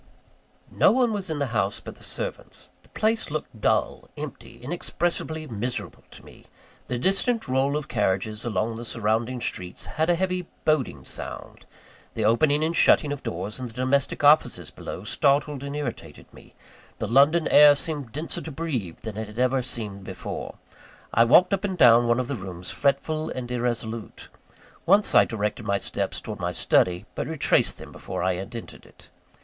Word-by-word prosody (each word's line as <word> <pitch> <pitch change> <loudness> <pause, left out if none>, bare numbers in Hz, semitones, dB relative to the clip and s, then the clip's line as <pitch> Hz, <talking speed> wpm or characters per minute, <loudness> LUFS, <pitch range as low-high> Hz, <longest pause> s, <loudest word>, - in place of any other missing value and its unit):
No - - +4
one 245 -2 +2
was 195 -4 -3
in 160 - -2
the 145 - 0
house 100 -2 0
but - - -9
the - - -17
servants. - - -6
The - - -24
place 220 +1 0
looked 145 -7 -5
dull, - - 0
empty, 135 -5 -8
inexpressibly 160 +3 -3
miserable 120 -1 -5
to - - -14
me; - - -16 0.4
the 125 - -2
distant 195 - +2
roll 135 +3 +1
of 150 - -5
carriages 105 +3 -1
along 110 0 -1
the 120 - -6
surrounding 115 +2 -1
streets 90 -5 -3
had 160 +2 -1
a 175 - +4
heavy 185 0 -2 0.2
boding 130 - 0
sound; - - -6 0.5
the 110 - 0
opening 145 +7 +3
and 165 +2 0
shutting 150 -3 +5
of 140 - -7
doors 95 +7 -4
in 125 - -4
the 115 - -12
domestic 130 +4 0
offices 150 +2 +4
below, 95 - -7
startled 140 +5 +1
and 140 +1 -5
irritated 145 -5 -6
me; - - -17 0.4
the - - -3
London 145 +6 +4
air 150 -1 +8
seemed 145 -5 -4
denser 155 +7 -2
to 160 - -7
breathe 135 - -4
than 110 -2 -6
it 110 -1 -4
had 105 +1 -12
ever 130 +1 +2
seemed 105 -6 -3
before. - - -6 0.6
I 115 - +5
walked 180 - +6
up 195 - 0
and 190 -3 -2
down 120 -4 +6
one 120 +1 +3
of 125 - -2
the 140 - -2
rooms, 90 -4 -6
fretful 155 +2 0
and 125 -1 -5
irresolute. 115 -2 -3 0.6
Once 200 +4 +4
I - - +7
directed 105 0 -3
my 100 - +2
steps - - -3
towards - - -7
my - - -2
study; 90 -1 +2
but - - -4
retraced - - +2
them - - -10
before - - -5
I 95 0 +2
had 95 +6 -6
entered 115 - -9
it. - - -19
130 Hz, 180 wpm, -25 LUFS, 110-155 Hz, 0.6 s, air